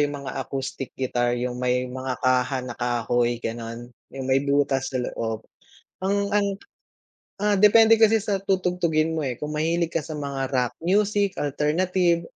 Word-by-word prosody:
yung 145 -1 -1
mga 135 - -4
acoustic 135 0 -5
guitar, 120 -2 0
yung 125 0 -3
may 125 0 +1
mga 130 0 -4
kaha 130 +1 +2
na 125 - -5
kahoy 120 0 0
ganun. 115 +1 -6 0.2
Yung 135 -1 -7
may 130 +1 +2
butas 140 -1 +1
na 125 - -1
loob 110 -1 -4 0.6
ang, 195 +2 +1 0.2
ang, 205 -1 +3 1.0
ah, 210 -1 +3
depende 225 +2 +7
kasi 220 0 +6
sa 200 -3 0
tutugtugin 180 -4 +1
mo, 160 - -1
eh, 130 -5 -2
kung 150 +2 -5
mahilig 165 +2 0
ka 165 - 0
sa 155 0 -7
mga 140 -2 -3
rock 125 -2 0
music, 200 +2 +1
alternative, 170 +4 +1
140 Hz, 160 wpm, -24 LUFS, 125-175 Hz, 1.0 s, depende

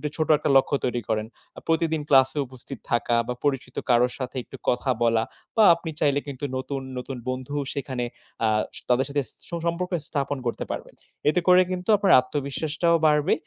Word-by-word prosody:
ছোট 155 0 0
একটা 150 - -2
লক্ষ্য 135 +1 +2
তৈরি 120 -1 -1
করেন। 110 -1 0 0.3
আ - - -5
প্রতিদিন 160 -1 +1
ক্লাসে 135 +1 +5
উপস্থিত 130 +1 -10
থাকা 120 0 +2
বা 125 - -1
পরিচিত 135 -3 -1
কারো 120 0 +5
সাথে 130 -1 -5
একটু - - -11
কথা 125 +2 0
বলা 115 -1 +3 0.3
বা 220 - +5
আপনি 165 -1 -7
চাইলে 145 -1 +2
কিন্তু 140 0 -5
নতুন, 135 +1 -4 0.2
নতুন 125 +1 -5
বন্ধু 130 +2 -4 0.2
সেখানে 130 -3 -3 0.4
আ - - +3 0.4
তাদের 125 +2 +3
সাথে 140 0 0 0.3
সুসম্পর্ক 170 +2 -2 0.2
স্থাপন 140 -1 -1
করতে 120 - -2
পারবেন। - - -6 0.4
এতে 165 - +2
করে 180 0 +7
কিন্তু 185 +2 -4
আপনার 200 -1 +4
আত্মবিশ্বাসটাও 150 +5 -1
বাড়বে 150 0 +3
140 Hz, 170 wpm, -25 LUFS, 125-160 Hz, 0.4 s, করে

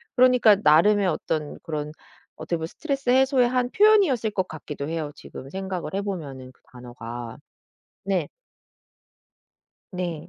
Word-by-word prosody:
그러니까 250 -5 +5
나름의 195 +7 +5
어떤 155 -3 -2
그런 150 -2 -4 0.5
어떻게 170 - -3
보면 160 - -4
스트레스 275 - -4
해소의 260 -1 +4
한 250 0 0
표현이었을 380 - +4
것 190 -2 -1
같기도 150 -2 -7
해요 160 -3 -3
지금 135 - -11
생각을 190 -3 -5
해 195 - -1
보면은 145 -10 -6
그 - - -33
단어가. 120 -1 -8 0.7
네. 195 -2 -1 1.6
네. 175 -3 -5
180 Hz, 290 characters per minute, -24 LUFS, 150-245 Hz, 1.6 s, 그러니까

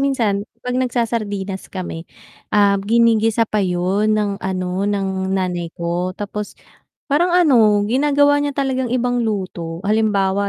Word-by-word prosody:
minsan, 225 -7 0
kapag 250 +1 -2
nagsa-sardinas 215 -6 -2
kami, 175 -3 -6 0.4
um, 200 -1 +3
ginigisa 225 +1 +3
pa 215 -1 -1
yun, 190 +3 +1
ng 205 -2 -1
ano, 185 +1 -2
ng 190 -2 -2
nanay 180 -3 -1
ko. 175 +2 -2
Tapos 205 0 -6 0.6
parang 345 +5 +3
ano 225 - +4
ginagawa 285 +4 +3
niya 290 -1 -2
talagang 260 -2 -1
ibang 245 -1 0
luto, 180 -6 -3
halimbawa 200 -2 +1
205 Hz, 125 wpm, -19 LUFS, 190-240 Hz, 0.6 s, ano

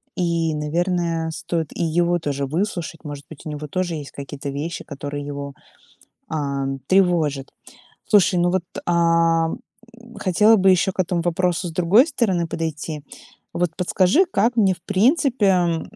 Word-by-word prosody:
и, 170 -2 0
наверное, 165 +1 -1
стоит 160 0 -3
и - - -2
его 175 +2 +1
тоже 140 -3 -2
выслушать. 170 +1 -3
Может 145 -1 -7
быть, 160 - -12
у 155 - -4
него 150 0 -6
тоже 180 +1 -2
есть 145 -3 -7
какие-то 140 0 -7
вещи, 150 +5 -4
которые 145 0 -6
его, 140 -1 -6 0.8
ам, 140 -3 -2
тревожат. 165 -8 +2 0.6
Слушай, 195 -3 +4
ну 175 0 +2
вот, 185 -1 0 0.2
а, 165 -1 +3 0.7
хотела 210 +4 +4
бы 190 -1 +4
ещё 185 +1 +2
к - - -19
этому 175 -1 -1
вопросу 175 +1 0
с - - -8
другой 180 - +5
стороны 210 - 0
подойти. 155 -2 -4 0.5
Вот 175 -1 0
подскажи, 185 - +3
как 230 +4 +2
мне 195 -4 +4
в 170 - -22
принципе, 200 - +2
170 Hz, 145 wpm, -22 LUFS, 150-185 Hz, 0.8 s, другой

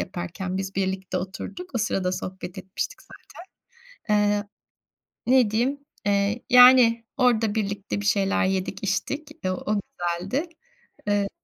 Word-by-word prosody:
yaparken 180 +1 -4
biz 190 0 -4
birlikte 190 -1 -2
oturduk. 195 - -7
O - - +1
sırada 185 -4 0
sohbet 185 -1 -6
etmiştik 190 - -5 0.9
zaten. 210 - +1
Eee, 205 0 -1 0.8
ne 250 -4 +4
diyeyim, 245 +6 +1 0.3
eee, 205 +3 +1
yani 250 -2 +7
orada 230 -4 +3
birlikte 205 -1 -2
bir - - -6
şeyler 200 -1 +2
yedik, 190 +1 -2
içtik, 280 +10 -2 0.2
o 185 - +2
o 205 +3 -1
güzeldi. 185 - -3 0.6
Eee 205 -1 +1
205 Hz, 125 wpm, -25 LUFS, 190-235 Hz, 0.9 s, yani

